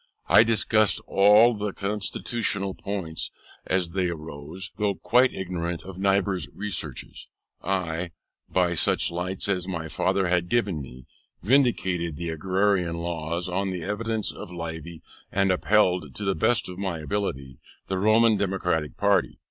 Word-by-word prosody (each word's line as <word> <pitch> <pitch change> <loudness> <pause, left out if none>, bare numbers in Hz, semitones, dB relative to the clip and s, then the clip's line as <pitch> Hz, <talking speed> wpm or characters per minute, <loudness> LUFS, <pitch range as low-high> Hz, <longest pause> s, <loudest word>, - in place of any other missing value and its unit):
I - - +8
discussed 110 -3 +3
all 105 +4 +6
the 105 -2 -3
constitutional 100 0 -1
points 95 -6 -4 0.4
as 90 -2 0
they 90 -1 0
arose: 80 +3 -7
though 105 -2 0
quite 125 +7 +3
ignorant 85 -2 -4
of 95 -1 -9
Niebuhr's 95 -1 +1
researches, 95 -10 -4 0.3
I, 90 -2 -2 0.4
by 90 -2 +2
such 85 - +2
lights 90 +3 -2
as 95 -2 0
my 85 -4 -4
father 95 +4 +1
had 90 0 +1
given 100 -10 0
me, 65 -1 -11 0.4
vindicated 95 - +2
the 85 +3 -4
Agrarian 90 +1 0
Laws 85 0 -3
on 95 +2 -1
the 90 -2 -4
evidence 110 +1 -1
of - - -9
Livy, 85 -1 -7 0.3
and 95 -1 +2
upheld, 90 -6 +2
to 105 - -4
the 95 - +2
best 115 +3 +1
of 90 0 -8
my 95 -4 -2
ability, 75 -7 -4 0.3
the 95 -1 -2
Roman 110 +2 +4
Democratic 90 -6 -1
party. 95 -11 +2
95 Hz, 140 wpm, -25 LUFS, 85-100 Hz, 0.4 s, I